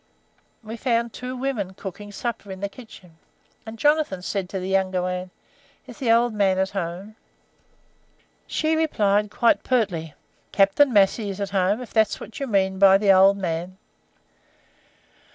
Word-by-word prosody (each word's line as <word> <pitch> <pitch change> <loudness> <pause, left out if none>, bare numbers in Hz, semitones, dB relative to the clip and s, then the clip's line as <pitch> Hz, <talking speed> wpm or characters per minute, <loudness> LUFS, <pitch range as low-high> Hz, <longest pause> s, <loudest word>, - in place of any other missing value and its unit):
We 225 +2 -7
found 235 -2 -1
two 255 +1 -6
women 230 -8 -3
cooking 205 +2 -8
supper 220 -1 -5
in 190 - -7
the 200 +1 -3
kitchen, 190 -7 -15 0.5
and 220 +1 -8
Jonathan 295 -10 +1
said 190 -1 -3
to 195 - -4
the 185 - -5
younger 190 -1 0
one, 180 0 -3 0.6
'Is - - -13
the 245 -5 +1
old 235 0 +3
man 195 -3 +2
at 190 0 0
home?' 195 +3 -5 1.3
She 315 0 0
replied 210 -10 +1
quite 230 +2 +2
pertly: 185 - -1 0.4
"'Captain 200 +8 +3
Massey 205 0 +2
is 195 0 -6
at 200 -1 -3
home, 195 +4 +1
if 245 - -13
that's 220 -1 +2
what 215 - -10
you 275 - -3
mean 190 -3 0
by 195 -1 +7
'old 195 +1 +5
man.' 180 0 -4
200 Hz, 155 wpm, -23 LUFS, 190-230 Hz, 1.3 s, by